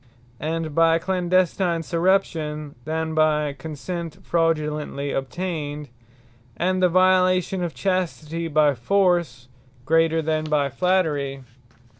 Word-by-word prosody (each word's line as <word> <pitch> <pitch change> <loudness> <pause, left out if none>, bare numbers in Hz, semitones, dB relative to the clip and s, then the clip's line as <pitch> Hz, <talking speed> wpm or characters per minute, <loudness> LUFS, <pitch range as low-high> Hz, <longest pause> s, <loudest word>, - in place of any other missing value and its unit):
And 160 0 -3
by 165 +1 +4
clandestine 180 -1 +1
Surreption, 165 -4 0
than 160 +1 -2
by 150 -2 +2
consent 160 +3 -7
fraudulently 150 -4 -1
obtained. 150 0 -4 0.7
And 185 +1 0
the 180 - +4
violation 185 0 +3
of 170 - -4
chastity 170 -3 -2
by 150 -2 +3
Force, 175 0 +1 0.4
greater, 165 0 +2
than 155 0 -1
by 150 -2 +1
flattery. 145 -6 0
165 Hz, 100 wpm, -23 LUFS, 150-180 Hz, 0.7 s, by